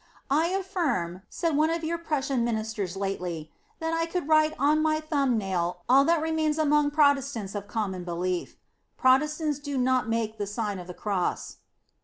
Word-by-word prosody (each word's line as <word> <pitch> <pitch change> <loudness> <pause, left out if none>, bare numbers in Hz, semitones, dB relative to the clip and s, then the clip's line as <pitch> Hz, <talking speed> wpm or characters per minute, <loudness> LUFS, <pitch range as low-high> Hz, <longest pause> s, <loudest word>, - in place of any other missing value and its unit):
" - - -44
I 310 +4 +3
affirm," 340 - -1
said 330 -4 -1
one 310 +2 +3
of 335 0 -2
your 335 +1 -1
Prussian 275 -6 -1
min 235 -2 0
isters 215 -4 -4
lately, 180 -5 -3
" - - -38
that 325 0 -2
I 330 0 0
could 340 -3 -3
write 310 0 +4
on 295 +3 +3
my 310 0 +2
thumb 280 -6 +1
nail 180 -3 -2
all 270 +2 +6
that 330 0 +2
remains 315 -1 0
among 295 -1 +3
Protestants 280 -8 +2
of 205 -1 -5
common 195 -5 -3
belief:" 175 +1 -3 0.4
Protestants 300 +3 +2
do 285 -1 -4
not 255 -2 +2
make 225 -1 -1
the 205 - -2
Sign 205 -2 -3
of 180 - -9
the 180 - -8
Cross. 195 -4 -2
270 Hz, 185 wpm, -27 LUFS, 200-310 Hz, 0.4 s, all